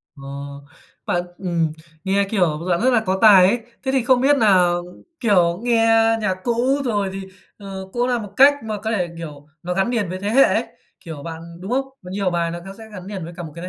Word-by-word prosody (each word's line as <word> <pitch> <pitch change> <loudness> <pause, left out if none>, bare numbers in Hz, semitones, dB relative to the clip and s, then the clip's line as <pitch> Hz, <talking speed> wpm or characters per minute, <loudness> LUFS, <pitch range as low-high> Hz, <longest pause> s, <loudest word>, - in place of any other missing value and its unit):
Ờ, 140 - -13 0.8
bạn 175 0 0
ừm, 170 -4 -1 0.3
nghe 195 +1 +1
kiểu 180 -8 +1
bạn 175 +2 +1
rất 255 - +3
là 225 - +5
có 190 0 0
tài 200 -4 +8
ấy. 240 +5 +1 0.2
Thế 265 - -1
thì 265 -2 +1
không 245 0 +3
biết 280 +2 +4
nà, 195 -6 +5 0.5
kiểu, 180 -7 +2
nghe 235 -2 +3 0.4
nhạc 200 -3 0
cũ, 255 +4 +1
rồi 205 -5 0
thì, 195 0 -6 0.3
ờ, 195 -2 -8
cũng 245 0 0
là 250 -1 +1
một 205 -3 -8
cách 275 +2 +8
mà 215 -1 -4
có 220 - -2
thể, 185 -6 0
kiểu, 150 -3 -9 0.2
nó 180 +1 -2
gắn 195 +4 0
liền 225 -7 -1
với 185 +1 -5
thế 200 +2 -3
hệ 265 +5 +6
ấy, - - +2 0.4
kiểu, 160 -6 -9
bạn 165 -1 -7 0.2
đúng 190 +5 -6
không? 270 +2 +1 0.2
Nhiều 190 +1 -2
bài 170 -1 -1
nó 170 - -5
có 195 - -8
sẽ 225 - -11
gắn 185 -1 -9
liền 195 -3 -6
với 170 +2 -8
cả 175 - -5
một 155 - -8
cái 170 +1 -7
195 Hz, 230 wpm, -21 LUFS, 175-230 Hz, 0.8 s, tài